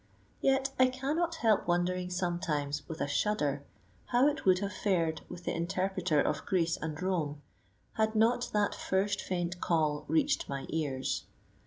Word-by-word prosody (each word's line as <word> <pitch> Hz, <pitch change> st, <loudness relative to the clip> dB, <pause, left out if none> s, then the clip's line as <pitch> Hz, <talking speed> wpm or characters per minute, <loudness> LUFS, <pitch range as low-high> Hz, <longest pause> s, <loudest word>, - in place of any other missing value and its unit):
Yet 270 Hz, 0 st, +2 dB
I 255 Hz, -, +7 dB
cannot 295 Hz, +7 st, -1 dB
help 225 Hz, -, +2 dB
wondering 180 Hz, +1 st, +1 dB
sometimes 155 Hz, -5 st, -2 dB
with 160 Hz, -, -5 dB
a -, -, +1 dB
shudder 145 Hz, -3 st, 0 dB, 0.4 s
how 245 Hz, +3 st, +4 dB
it 295 Hz, -, -5 dB
would 185 Hz, -1 st, +6 dB
have 200 Hz, +1 st, -3 dB
fared 170 Hz, -5 st, 0 dB
with 180 Hz, -, -8 dB
the -, -, -1 dB
interpreter 185 Hz, -1 st, 0 dB
of 145 Hz, 0 st, 0 dB
Greece 170 Hz, -3 st, +1 dB
and 155 Hz, -1 st, -4 dB
Rome 160 Hz, -6 st, -1 dB, 0.5 s
had 220 Hz, 0 st, +1 dB
not 230 Hz, +3 st, +3 dB
that 210 Hz, -1 st, +1 dB
first 195 Hz, +1 st, 0 dB
faint 175 Hz, -1 st, -3 dB
call 150 Hz, -3 st, +1 dB
reached 300 Hz, -1 st, +1 dB
my 140 Hz, -1 st, -3 dB
ears. 140 Hz, -5 st, -2 dB
180 Hz, 155 wpm, -31 LUFS, 160-215 Hz, 0.5 s, I